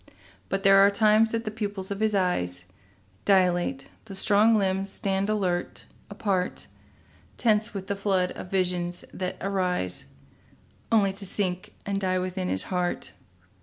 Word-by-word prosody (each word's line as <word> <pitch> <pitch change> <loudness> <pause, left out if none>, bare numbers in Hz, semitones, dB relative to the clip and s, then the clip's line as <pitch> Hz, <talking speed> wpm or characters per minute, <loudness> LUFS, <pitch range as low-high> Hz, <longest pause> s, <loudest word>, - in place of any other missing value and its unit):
But 195 +1 -1
there 195 0 +7
are 200 +1 +7
times 215 +2 +4
the 225 -1 -2
pupils 205 -3 -5
of 200 - -3
his 215 -1 +1
eyes 90 - -1 0.6
Dilate, 185 +6 +2 0.2
the 200 -3 -8
strong 210 +3 +4
limbs 195 -1 0
stand 195 +1 -1
alert, 185 -4 -1 0.2
apart, 200 -3 -1 0.7
Tense 215 -1 +1
with 190 -1 -4
the 200 - -2
flood 195 -2 0
of 185 - -8
visions 180 -2 -1
that 185 -1 -4
arise 180 - -1 0.9
Only 200 -4 +3
to 195 +1 -7
sink 185 -2 -3
and 200 0 -2
die 185 -1 +1
within 185 0 -2
his 95 - 0
heart. 180 -1 -1
195 Hz, 140 wpm, -26 LUFS, 180-205 Hz, 0.9 s, there